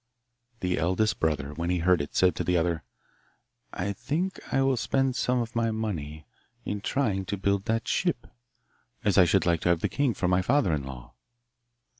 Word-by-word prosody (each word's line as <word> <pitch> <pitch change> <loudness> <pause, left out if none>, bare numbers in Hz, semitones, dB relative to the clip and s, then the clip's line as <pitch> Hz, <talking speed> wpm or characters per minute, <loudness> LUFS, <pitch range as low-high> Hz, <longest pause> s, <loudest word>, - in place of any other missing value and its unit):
The 90 -1 0
eldest 95 +6 +1
brother, 75 -2 -1
when 85 +3 -3
he 90 - +1
heard 90 -1 +3
it, 70 - -7
said 90 -3 +4
to - - -2
the 90 +1 +2
other, 85 -1 0 0.9
'I 100 +3 -2
think 170 - -2
I 135 - +3
will 135 -1 +3
spend 135 +2 0
some 125 0 +1
of 115 -1 -4
my 115 0 +1
money 80 -10 -4 0.4
in 105 -1 -3
trying 105 -6 0
to 100 +2 -3
build 100 +1 0
that 115 0 -1
ship, - - 0 0.8
as 100 -1 +3
I 90 - +8
should 85 - +2
like 85 -2 +2
to - - +1
have 85 -1 +2
the - - +1
king 140 -5 0
for 90 - -1
my 90 +1 +3
father 120 - +2
in 75 - 0
law. 65 -2 -9
95 Hz, 195 wpm, -27 LUFS, 85-115 Hz, 0.9 s, I